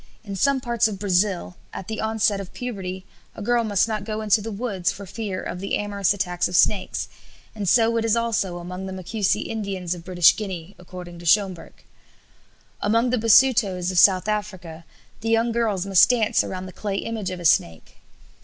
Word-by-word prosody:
In 200 -3 -6
some 275 +8 +2
parts 235 -3 +1
of 210 -3 -5
Brazil 190 -2 0 0.2
at 190 - -7
the 220 - -4
onset 220 -2 +1
of 190 - -11
puberty 190 -6 -5 0.3
a - - -8
girl 240 +2 +2
must 205 -1 +1
not 215 -2 -3
go 215 0 -4
into 215 0 +2
the 225 +2 -5
woods 200 -4 -2
for 200 - -9
fear 200 -1 -5
of 180 - -5
the 195 +1 -2
amorous 200 -2 0
attacks 180 -3 -1
of 180 - -5
snakes, 195 +2 +2 0.5
and 205 -4 -2
so 230 +1 +4
it 225 - 0
is 225 0 +2
also 225 -6 -1
among 180 +2 -7
the 190 - -6
Macusi 195 +3 -1
Indians 195 -5 -4
of 175 -2 -9
British 175 -2 +4
Guiana, 190 -3 -6
according 180 -1 -10
to 170 - -11
Schomburgk. 190 -2 0 1.0
Among 230 +4 +2
the 250 - +1
Basutos 215 -6 +4
of 180 - +2
South 185 0 +5
Africa 185 -6 -4 0.3
the 225 - -3
young 230 +1 +2
girls 220 -5 0
must 195 -2 +5
dance 230 -3 +2
around 185 0 -5
the 185 - -10
clay 205 -2 -4
image 215 -1 -3
of 185 -1 -6
a 175 - -8
snake. 85 - +1
200 Hz, 190 wpm, -23 LUFS, 185-220 Hz, 1.0 s, South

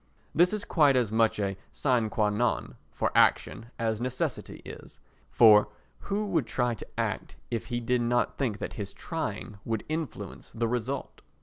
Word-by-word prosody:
This 175 +3 +5
is 210 -1 -3
quite 145 -5 +4
as 120 -5 +2
much 110 -1 +2
a 100 -1 -1 0.2
sine 125 -5 +1
qua 105 -1 +1
non 120 +3 0 0.2
for - - -1
action 115 - +3
as 110 -1 -1
necessity 130 0 -3
is; - - -11 0.3
for 105 -3 +7 0.4
who 205 +2 0
would 165 - 0
try 125 +1 0
to 115 - -9
act - - -2 0.2
if 115 -2 -2
he 120 -1 -2
did 120 +1 +1
not 120 +1 +1
think 120 -7 -1
that - - -5
his 100 -2 -6
trying 110 -9 -4
would 115 -2 -2
influence 155 -1 -5
the 115 0 0
result? 125 +3 -3
120 Hz, 170 wpm, -28 LUFS, 110-135 Hz, 0.4 s, for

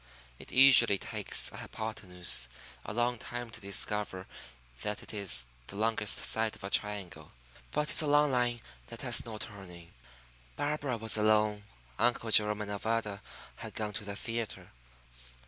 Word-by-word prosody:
It - - -11
usually 125 -6 +7
takes - - 0
a - - -11
hypotenuse 90 - +1 0.3
a - - -6
long 120 +1 -1
time 120 0 -7
to 110 - -7
discover 100 -1 -1 0.6
that 105 0 -3
it - - -10
is 95 - +1 0.2
the - - -10
longest 110 0 +2
side 110 -1 +2
of - - -12
a 95 - -5
triangle. 100 -3 -2 0.4
But 150 0 -2
it's - - +3
a 155 - -2
long 145 0 +3
line 120 -2 0 0.3
that 115 +4 -8
has 120 -2 +2
no 110 -2 -7
turning. 90 -6 -10 0.6
Barbara 145 -4 -2
was 110 0 +4
alone. 105 -1 +2 0.3
Uncle 115 -1 +1
Jerome 105 -1 +4
and 105 - -6
Nevada 105 -1 -3 0.4
had - - -9
gone 105 -1 -2
to 105 - -4
the 100 0 -6
theatre. 115 +1 -5
110 Hz, 155 wpm, -30 LUFS, 100-120 Hz, 0.6 s, usually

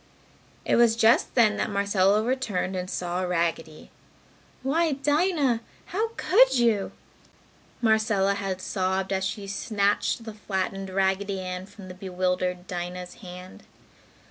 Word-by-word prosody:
It - - +2
was 235 -1 +5
just 230 +1 +3
then, 220 -4 +4
that - - -1
Marcella 200 0 +2
returned 220 -7 -1
and 180 0 -3
saw 180 0 -2
Raggedy. 165 -3 -2 0.7
"Why, 315 +3 +1
Dinah! 290 -3 +1 0.3
How 430 +5 +1
could - - +5
you!" 230 -5 +2 0.9
Marcella 220 -3 +3
had 195 -2 -3
sobbed 190 0 -1
as 190 0 -1
she 200 +1 -3
snatched 205 +2 0
the 220 -1 -7
flattened 195 -2 -3
Raggedy 195 +1 0
Ann 185 0 -5
from 205 -2 -12
the 180 - -8
bewildered 180 -1 -2
Dinah's 180 0 -5
hand. 180 -1 -10
195 Hz, 125 wpm, -26 LUFS, 185-225 Hz, 0.9 s, was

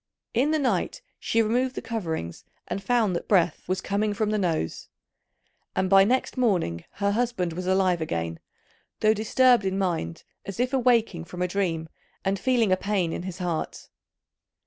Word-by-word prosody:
In 255 +6 +2
the 315 - +2
night, 300 - -1 0.2
she 225 0 +2
removed 250 +4 0
the - - -3
coverings, 160 - -4 0.2
and 195 - -3
found 220 -3 +2
that - - -4
breath 175 -4 +3
was 185 +1 -1
coming 205 +1 0
from 215 0 0
the 215 - +1
nose; 165 - -2 0.9
and 190 0 0
by 195 0 +8
next 255 +5 0
morning 175 - +1
her 200 0 0
husband 210 -6 0
was 180 +2 -5
alive 185 -2 +2
again, 85 - -3 0.6
though 215 0 +5
disturbed 240 +2 +4
in 190 0 -1
mind 170 - -2 0.2
as 195 +2 -7
if 250 +2 0
awaking 230 -9 +2
from 180 +1 -4
a - - +1
dream 170 -4 -1 0.4
and 195 0 +1
feeling 240 -5 +2
a 185 - +4
pain 190 -4 0
in - - -3
his 185 -1 -6
heart. 175 -4 -3
195 Hz, 170 wpm, -26 LUFS, 175-230 Hz, 0.9 s, by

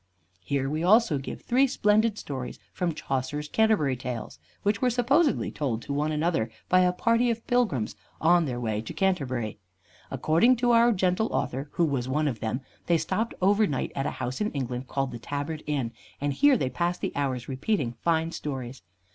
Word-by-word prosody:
Here 135 +3 -1
we 155 +3 -2
also 200 - +4
give 135 - -7
three 265 +3 +3
splendid 215 -3 +2
stories 130 -8 -5 0.2
from 170 -3 -1
Chaucer's 140 +3 -3
"Canterbury 205 -9 +2
Tales," 125 -3 -6 0.2
which 205 0 +1
were 255 - +3
supposedly 265 +6 +2
told 125 -7 -2
to 140 - -4
one 150 +2 0
another 155 -6 0 0.2
by 185 - +5
a 180 0 +4
party 230 +6 +2
of 230 0 -2
pilgrims 210 - +1 0.2
on 170 +1 +4
their 125 -4 -3
way 110 -3 -1
to 110 - -7
Canterbury. 130 - -1 0.5
According 160 - +3
to 240 0 +2
our 235 +1 +6
gentle 185 +1 +1
author, 135 +2 -2
who 170 - +2
was 130 -5 -1
one 150 +3 +1
of 120 -6 -2
them, 115 +5 -2 0.3
they 170 - +4
stopped 220 +8 -2
over 205 +2 +4
night 135 -6 -2
at 135 0 -1
a - - -5
house 130 +4 -3
in 210 - 0
England 130 -2 -3
called 135 0 -2
the 120 - -7
Tabard 145 +5 -4
Inn, 135 -6 -1 0.3
and 145 0 -1
here 285 - +5
they 130 -10 -1
passed 175 +7 -1
the - - -3
hours 130 -4 -2
repeating 135 - -1
fine 165 -1 +1
stories. 130 -5 -5
150 Hz, 190 wpm, -27 LUFS, 130-210 Hz, 0.5 s, our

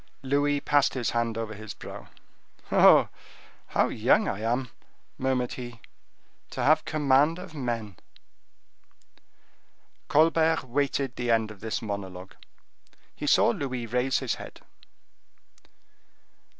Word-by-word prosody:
Louis 145 +2 +1
passed 145 -1 +2
his 125 -3 -1
hand 115 -1 -1
over 115 -1 -4
his 110 0 -9
brow: - - -10 0.6
"Oh! - - +6 0.6
how - - +1
young - - +2
I 95 - -2
am," 120 +3 -1 0.5
murmured 130 -2 0
he, 120 -2 -8 0.7
"to - - -4
have 155 +1 +4
command 150 +2 +2
of 180 -2 -10
men." 115 - -4 2.1
Colbert 160 +1 +3
waited 135 0 -1
the 120 -1 -2
end 110 -2 +2
of 105 - -13
this 110 +1 -4
monologue. 95 -3 -6 0.8
He 150 - -5
saw 220 - +5
Louis 135 - -3
raise 125 +3 0
his 130 -4 -1
head. - - -11
125 Hz, 115 wpm, -27 LUFS, 115-145 Hz, 2.1 s, Oh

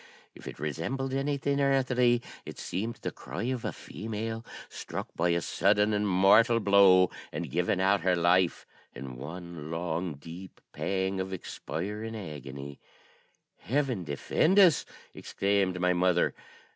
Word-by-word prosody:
If - - -13
it - - -7
resembled 125 - -3
anything 140 0 0
earthly 125 -3 +2 0.2
it - - -9
seemed 110 +6 -3
the - - -2
cry 100 - -7
of 125 0 -2
a - - -2
female, 110 +1 -5 0.2
struck - - -6
by 85 +1 +1
a 85 0 +1
sudden 105 +4 +2
and 105 0 +1
mortal 105 +5 +5
blow, 100 -3 +6 0.2
and 85 -6 -5
giving 90 +4 +1
out 95 +1 +3
her 90 0 +2
life 85 +1 +2 0.3
in 65 0 -7
one 80 +3 -8
long 85 0 -3
deep 85 +6 -11
pang 95 0 -1
of 95 0 -3
expiring 105 +5 -5
agony. 70 - -8 0.8
'Heaven 130 -6 -1
defend 120 - +1
us!' 180 -6 +6 0.3
exclaimed 100 -2 0
my 90 0 +2
mother. 90 0 +2
95 Hz, 135 wpm, -29 LUFS, 85-115 Hz, 0.8 s, blow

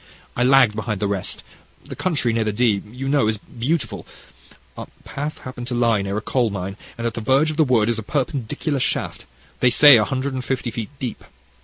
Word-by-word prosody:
I 125 - +1
lagged 130 -4 +5
behind 110 -2 -3
the 105 - -1
rest: 100 -2 -2 0.4
the - - -8
country 145 -10 0
near 115 0 +1
the 110 - -1
Dee, 105 -2 +2
you 130 +3 -5
know, 140 -5 +2
is 110 0 0
beautiful. 130 +9 -3 0.7
Our - - -7 0.2
path 145 +2 -5
happened 130 -2 -7
to 125 - -3
lie 115 -3 +2
near 100 +1 -3
a - - -2
coal 120 0 0
mine, 95 -1 -5 0.2
and 115 - -4
at 115 - -1
the 115 - -5
verge 135 +7 +3
of 155 - -7
the 160 - +5
wood 120 -6 +2
is 115 -1 0
a - - -3
perpendicular 135 +3 -2
shaft, - - -2 0.3
they 125 - +4
say, 145 +2 +8
a 110 - +3
hundred 135 +4 -2
and 130 -1 -3
fifty 125 -2 -2
feet 115 -1 -5
deep. 125 -4 -5
120 Hz, 215 wpm, -21 LUFS, 110-135 Hz, 0.7 s, say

